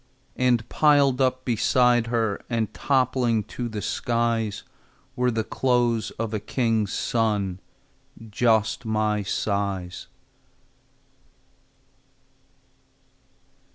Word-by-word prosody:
And 120 -3 +1
piled 140 -3 +3
up 130 0 0
beside 120 0 +2
her 115 -4 -1
And 115 -3 -1
toppling 125 -4 +1
to 120 -1 -3
the 105 -2 -5
skies, 115 -3 -1 0.5
Were 125 -1 +1
the 115 -2 -1
clothes 120 -1 0
of 115 -1 -3
a 110 - -1
king's 110 -1 0
son, 105 -5 -1 0.7
Just 110 +1 +1
my 110 -2 0
size. 100 -3 -3
115 Hz, 85 wpm, -24 LUFS, 105-125 Hz, 0.7 s, piled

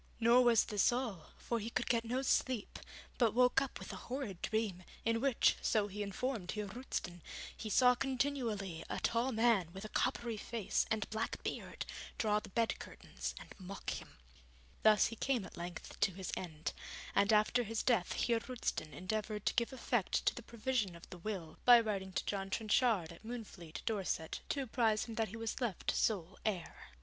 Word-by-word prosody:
Nor 235 +2 +6
was 235 -2 +6
this 210 +1 +3
all, 240 -9 -2
for 235 - -2
he 220 +2 -4
could - - -1
get 235 -2 +2
no 250 +3 -1
sleep, 255 -4 +1 0.4
but 230 -3 +4
woke 250 +1 +5
up 275 - -3
with - - -7
a - - -9
horrid 245 -9 -3
dream, 215 -5 -1 0.2
in 230 0 +2
which, 275 -3 +4
so 215 -2 +2
he 205 +1 -5
informed 205 -1 -2
Heer 210 -1 -2
Roosten, 195 -5 -4 0.3
he 220 - -5
saw 250 +3 +6
continually 245 - -1
a - - -2
tall 235 +3 +1
man 225 -6 +3
with 195 +2 -7
a - - -6
coppery 240 -2 0
face 225 -1 -1
and 220 -2 0
black 220 +1 -2
beard - - -4 0.3
draw 210 -1 +2
the - - -11
bed 230 +3 +1
curtains - - -6
and - - -11
mock 190 +1 -5
him. - - -7 0.6
Thus 215 -1 +6
he 230 - -2
came 245 -3 0
at - - -11
length 175 -1 -7
to 200 - +3
his 190 -1 -4
end, 160 -3 -4 0.4
and 200 +2 +4
after 215 +3 +4
his 225 -1 -2
death 230 -8 +2
Heer 235 -1 +2
Roosten 225 - -3
endeavoured 210 +2 -3
to - - +3
give 235 +1 +1
effect 240 -5 0
to - - +4
the - - -7
provision 235 -5 -1
of 170 - -12
the 180 - -8
will, 175 -5 -5
by 245 -1 +9
writing 200 -4 -2
to - - -1
John 195 -1 -2
Trenchard, 215 -4 +2
at 170 - -13
Moonfleet, 215 -8 -7
Dorset, 195 -7 -1
to 280 - 0
apprise 225 -3 +2
him 230 - -7
that 220 0 0
he 225 - -7
was 225 +3 -3
left 230 -8 0
sole 190 -4 0
heir. 190 -6 -3
220 Hz, 190 wpm, -36 LUFS, 195-240 Hz, 0.6 s, by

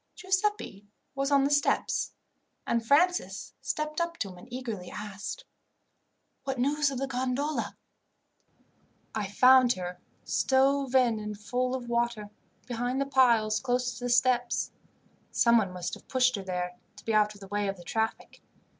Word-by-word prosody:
Giuseppi 380 - -1 0.3
was 275 0 -1
on 280 -1 +4
the 280 - +1
steps, 285 0 +1 0.5
and 235 -1 0
Francis 345 +9 +2
stepped 305 +1 -2
up 340 0 -2
to 200 - -3
him 180 - -11
and 235 +6 -15
eagerly 230 -8 -5
asked, 210 - -6 1.0
"What 270 -1 -3
news 285 +3 +2
of 270 - -4
the 270 - -1
gondola?" 265 +3 -2 1.4
"I 210 -2 -2
found 250 +4 +6
her, 180 -3 -6 0.2
stove 270 0 +2
in 240 -4 +4
and 210 -1 -5
full 250 +4 -1
of 250 -2 -6
water, 235 -3 -1 0.3
behind 245 +2 -2
the 275 - +1
piles 235 -6 +3
close 250 -1 -1
to 245 - -5
the - - -1
steps. 245 0 +2 0.6
Someone 230 -5 +3
must 180 -1 -5
have - - -9
pushed 255 -1 +3
her 200 - -5
there, 180 -1 -4 0.2
to 205 - -15
be 225 - 0
out 210 0 +3
of - - -14
the 195 - -9
way 205 0 -1
of 195 0 -3
the 175 - -12
traffic. 220 +6 -3
245 Hz, 160 wpm, -29 LUFS, 210-270 Hz, 1.4 s, found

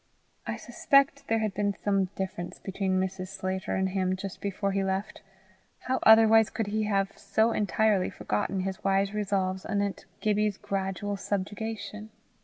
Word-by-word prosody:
I - - -1
suspect 275 0 +2
there 225 - +2
had 210 - -2
been 205 -1 0
some 195 -2 +1
difference 185 -2 -4
between 190 -1 -1
Mrs. 185 0 -2
Sclater 185 0 -3
and 190 0 +1
him 185 -1 0
just 190 0 -7
before 200 0 -1
he 195 0 0
left: 190 +2 -2 0.6
how 260 0 -1
otherwise 220 0 +7
could 225 -1 -2
he 215 +1 -1
have 195 -2 0
so 220 +1 +1
entirely 210 -2 +2
forgotten 185 - -2
his 190 0 -4
wise 195 +1 +2
resolves 195 -3 -1
anent 200 -1 -2
Gibbie's 210 -1 +1
gradual 195 +1 -3
subjugation? 210 +2 -4
200 Hz, 150 wpm, -28 LUFS, 190-210 Hz, 0.6 s, otherwise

